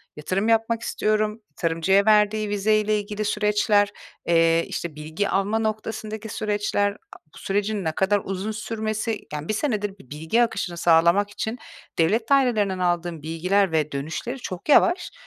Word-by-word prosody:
yatırım 185 +8 -2
yapmak 225 +1 +2
istiyorum, 215 0 -1
tarımcıya 170 +5 +2
verdiği 210 0 +3
vizeyle 215 +1 +2
ilgili 210 +1 -4
süreçler, 210 0 +2 0.4
eee, 165 0 +3
işte, 170 -3 -5
bilgi 155 +6 -3
alma 200 +3 +1
noktasındaki 220 0 -4
süreçler, 205 -1 0
a - - -17 0.2
sürecin 205 +1 -1
ne 160 - 0
kadar 195 +4 +1
uzun 195 +3 -3
sürmesi, 215 0 -3
yani 150 +1 -5
1 215 - 0
senedir 210 -6 -2
bir 130 - -18
bilgi 160 +11 +1
akışını 195 -6 -3
sağlamak 170 +4 +4
için 220 +3 -4 0.4
devlet 220 +9 +2
dairelerinden 220 -9 +2
aldığım 175 -2 -1
bilgiler 180 +5 +1
ve 155 -2 0
dönüşleri 160 - -4
çok 185 +1 -7
yavaş. 350 +4 +4
205 Hz, 140 wpm, -24 LUFS, 175-215 Hz, 0.4 s, sağlamak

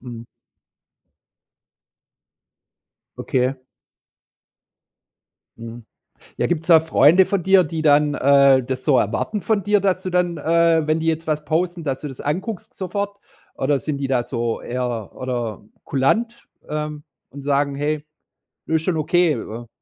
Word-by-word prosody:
Mhm. 120 -2 -9 2.9
Okay. 130 +1 0 2.0
Mhm. 115 0 -10 0.5
Ja, - - 0
gibt's 165 -1 -2
da 165 -2 +7
Freunde 160 +3 +5
von 195 -1 -1
dir, 190 +1 +5
die 160 0 -4
dann, 150 -1 +4
äh, 140 -2 +4
das 130 +1 -5
so 140 -4 +4
erwarten 210 - -1
von 205 +2 0
dir, 205 +1 +3
dass 190 -1 0
du 185 - -3
dann, 175 -1 0
äh, 165 +1 +2
wenn 155 +1 +1
die 160 - -3
jetzt 160 0 -1
was 155 -1 -1
posten, 170 +2 -1
dass 135 -3 -2
du 150 - -5
das 135 -3 -9
anguckst 190 +7 -4
sofort? 200 +2 -4 0.4
Oder 140 +1 0
sind 150 0 -3
die 140 -1 -3
da 125 -3 0
so 120 -2 -3
eher 120 -4 -4
oder 120 -5 -4 0.2
kulant, 225 - -1 0.2
ähm, 150 -1 -4 0.3
und 140 - -10
sagen: 140 0 0
„Hey, 150 +1 -2 0.6
ist 160 0 0
schon 170 -1 0
okay 160 +1 +2
wa 115 +2 -8
150 Hz, 140 wpm, -21 LUFS, 135-175 Hz, 2.9 s, da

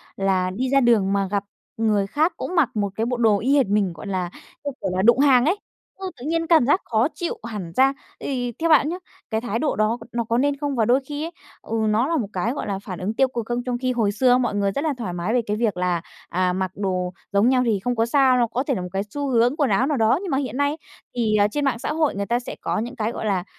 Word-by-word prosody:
là 190 -2 +1
đi 245 +8 -2
ra 275 +1 +4
đường 220 -6 +3
mà 200 -1 +1
gặp 200 -1 0 0.3
người 210 -3 +1
khác 315 - +1
cũng 365 - -4
mặc 325 -8 +4
một 205 -2 0
cái 225 - -1
bộ 250 +1 -1
đồ 220 -4 +3
y 270 +5 +2
hệt 265 -6 +3
mình, 200 -3 +1
gọi 165 - -9
là, 185 -3 -2 0.3
như 285 - -2
kiểu - - -1
là, 185 - +1
đụng 235 +5 +5
hàng 270 -3 +5
ấy. 355 +7 +2 0.4
Ừ, 380 -1 -4
tự 245 - -9
nhiên 330 +1 0
cảm 320 -7 +5
giác 295 +9 +3
khó 225 +2 +2
chịu 345 - -3
hẳn 200 -7 -6
ra, 270 +1 +4 0.3
thì 245 -3 -2
theo 330 +1 +1
bạn 300 -1 +5
nhá, 350 - -3 0.3
cái 220 -1 -1
thái 230 -1 -2
độ 295 - 0
đó 215 +2 +1
n - - -9
nó 235 - +1
có 230 +1 0
nên 285 +2 +1
không? 285 -1 -2
Và 225 -3 +2
đôi 245 +4 +4
khi 290 +2 -4
ấy, 335 - -6 0.3
ừ, 225 - -3
nó 220 +5 +2
là 330 +1 +1
một 230 -8 -1
cái, 190 +5 0
gọi - - -4
là, 195 -2 -2
phản 185 -4 -6
ứng 195 +4 -2
tiêu 265 +3 +3
cực 240 -3 -4
không? 240 +1 -2
Trong 250 -1 -2
khi 255 +1 -1
hồi 220 -4 +1
xưa 250 +5 +2
ấy 250 +1 +5
mọi 240 -4 -1
người 200 -1 +1
rất 280 - -2
là 310 -2 0
thoải 220 -8 -4
mái 175 +5 -2
về 245 - +3
cái 210 +1 -1
việc 220 -5 0
là, 180 -2 0 0.3
à, 180 +1 +1
mặc 185 -1 -2
đồ 185 -2 -2 0.2
giống 200 +4 +4
nhau 255 -1 +3
thì 220 -4 +1
không 245 +5 -1
có 225 0 +2
sao 260 +1 +4
đâu, 240 -1 +3
có 240 +3 -2
thể 280 -2 -1
là 185 - -3
một 180 - -4
cái 195 0 -1
xu 285 +4 -3
hướng 245 +1 +3
quần 285 -4 +2
áo 225 +6 +2
nào 295 -2 0
đó, 225 +4 +3
nhưng 380 - -4
mà 270 - +2
hiện 255 -3 -3
nay, 285 +2 +1 0.4
thì, 225 -3 +1
à, 205 -1 +4
trên 285 +7 -2
mạng 260 -4 0
xã 300 - -2
hội 310 -6 +1
người 200 0 -2
ta 235 +3 0
sẽ 245 - -7
có - - -1
những 240 +3 -4
cái, 220 +1 -1
gọi 225 - -5
là, 195 -4 0
235 Hz, 300 wpm, -23 LUFS, 200-270 Hz, 0.4 s, đụng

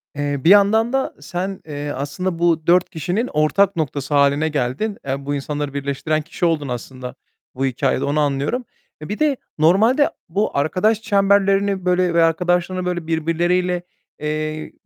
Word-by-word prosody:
Eee, 145 -1 -2
bir 170 - +4
yandan 220 +4 +5
da 270 0 0
sen, 185 +5 -4
eee, 145 -1 -5
aslında 165 +6 -3
bu 165 -2 +1
4 180 +1 +4
kişinin 180 - -2
ortak 180 +6 +2
noktası 145 -2 -3
hâline 140 +2 +3
geldin. 145 - -2
E, 135 +1 -3
bu 145 0 -1
insanları 145 0 -4
birleştiren 140 +2 -1
kişi 170 +3 -3
oldun 155 -4 0
aslında 125 +1 -6 0.4
bu 135 +1 -1
hikâyede, 130 +1 0
onu 145 +2 0
anlıyorum. 145 - -1 0.4
E, 155 - -8
bir 210 - -4
de 295 -4 +2 0.2
normalde 220 - +4 0.2
bu 200 -2 -1
arkadaş 205 +9 +1
çemberlerini 200 -1 +2
böyle 180 -1 +2
ve 170 -1 +4
arkadaşlarını 180 +2 +1
böyle 175 -2 -3
birbirleriyle, 175 +2 0 0.4
eee, 155 +1 -3
165 Hz, 155 wpm, -20 LUFS, 145-190 Hz, 0.4 s, yandan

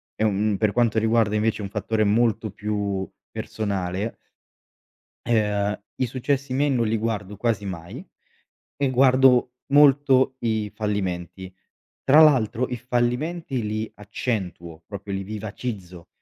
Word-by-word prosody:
ehm, 105 -1 +1
per 105 -2 +2
quanto 115 -2 +2
riguarda 110 -1 +2
invece 110 0 0
un 100 - -5
fattore 110 +1 -1
molto 110 +1 +1
più 100 -2 -3 0.2
personale 100 0 -3 1.1
ehm, 105 -3 +1 0.2
i 130 - +1
successi 130 +2 -2
miei 145 +2 +2
non 120 -4 +1
li 110 - +1
guardo 105 -2 -3
quasi 110 -3 -1
mai, 95 - -7 0.7
e 140 -1 +1
guardo 130 -1 +4 0.2
molto 135 -2 +5
i 110 -2 -1
fallimenti. 95 -3 -3 0.5
Tra 145 +4 +7
l'altro, 130 -5 +4
i 125 - -3
fallimenti 125 +4 -1
li 110 +1 -3
accentuo 95 -6 -4
proprio 100 -1 -7
li 95 - -2
vivacizzo, 100 -4 -6
110 Hz, 120 wpm, -24 LUFS, 100-125 Hz, 1.1 s, Tra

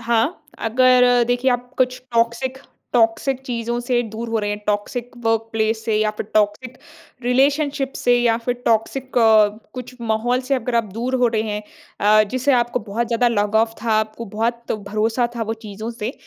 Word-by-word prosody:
हाँ, 235 +7 0
अगर 250 +1 +4
देखिए 245 +2 +1
आप 245 +1 -2
कुछ 255 -1 +1
टॉक्सिक, 235 +3 0 0.3
टॉक्सिक 240 +3 +2
चीज़ों 235 -1 -2
से 245 0 0
दूर 230 +2 -5
हो 225 0 0
रहे 205 -1 -2
हैं 205 - -3
टॉक्सिक 230 +4 -2
वर्कप्लेस 225 0 0
से 220 - 0
या 215 0 +2
फिर - - -4
टॉक्सिक 215 +4 0 0.4
रिलेशनशिप 275 +2 +1
से 245 0 +3
या 235 -1 +3
फिर 245 +1 -2
टॉक्सिक 245 +3 0
अ, 220 -2 +6 0.3
कुछ 250 0 -7
माहौल 235 +2 0
से 275 - +3
अगर 250 -1 -2
आप 230 - +2
दूर 240 +5 -2
हो 250 -1 +3
रहे 220 -2 0
हैं 210 -1 -3 0.4
अ, 215 +1 +5
जिसे 260 +2 +1
आपको 240 -1 +1
बहुत 230 +4 -1
ज़्यादा 240 +1 +2
लगाव 220 +1 +1
था 230 - -1
आपको 220 +2 -3
बहुत 235 +1 -1
भरोसा 215 +3 -1
था 230 - -1
वो 225 0 -2
चीज़ों 215 +3 -6
से। 230 +1 -4
235 Hz, 175 wpm, -21 LUFS, 220-250 Hz, 0.4 s, अ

